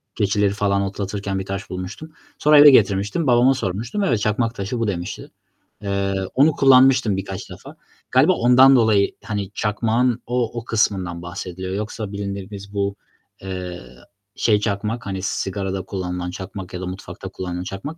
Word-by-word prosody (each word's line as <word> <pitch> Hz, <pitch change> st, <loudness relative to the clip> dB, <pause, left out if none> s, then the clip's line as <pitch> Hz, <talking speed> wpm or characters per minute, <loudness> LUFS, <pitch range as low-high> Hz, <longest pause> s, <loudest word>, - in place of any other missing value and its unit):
keçileri 100 Hz, -1 st, +2 dB
falan 100 Hz, -1 st, +1 dB
otlatırken 100 Hz, 0 st, -3 dB
bir 95 Hz, -, -5 dB
taş 100 Hz, +1 st, -5 dB
bulmuştum. 95 Hz, +12 st, -7 dB, 0.3 s
Sonra 150 Hz, 0 st, +5 dB
eve 145 Hz, -, +10 dB
getirmiştim. 105 Hz, -, +2 dB
Babama 125 Hz, +2 st, +5 dB
sormuştum, 115 Hz, -, -3 dB
"Evet, 120 Hz, -, +1 dB
çakmak 115 Hz, +3 st, 0 dB
taşı 100 Hz, +5 st, -4 dB
bu." 115 Hz, -, 0 dB
demişti. 90 Hz, -3 st, -5 dB, 0.5 s
Eee, 100 Hz, -1 st, -1 dB, 0.2 s
onu 145 Hz, +4 st, +5 dB
kullanmıştım 130 Hz, -6 st, +5 dB
birkaç 95 Hz, 0 st, -6 dB
defa. -, -, -11 dB, 0.4 s
Galiba -, -, +5 dB
ondan 130 Hz, +3 st, +6 dB
dolayı, 110 Hz, -5 st, +3 dB
hani, 100 Hz, -2 st, -4 dB
çakmağın 115 Hz, +3 st, 0 dB
o 120 Hz, -1 st, -1 dB
o 115 Hz, -, -11 dB
kısmından 95 Hz, -6 st, 0 dB
bahsediliyor. 90 Hz, +1 st, -6 dB
Yoksa 105 Hz, 0 st, -4 dB
bildiğimiz 100 Hz, 0 st, -6 dB
bu, 100 Hz, 0 st, -1 dB, 0.5 s
eee, 90 Hz, -2 st, -6 dB, 0.5 s
şey 105 Hz, -3 st, +2 dB
çakmak, 105 Hz, +3 st, -2 dB
hani, 95 Hz, -2 st, -4 dB
sigarada 95 Hz, 0 st, -3 dB
kullanılan 90 Hz, -2 st, -4 dB
çakmak 95 Hz, -1 st, -8 dB
ya 90 Hz, -, -5 dB
da -, -, -4 dB
mutfakta 95 Hz, +2 st, -7 dB
kullanılan 90 Hz, -1 st, -5 dB
çakmak, 120 Hz, -, -6 dB
100 Hz, 150 wpm, -21 LUFS, 95-115 Hz, 0.5 s, eve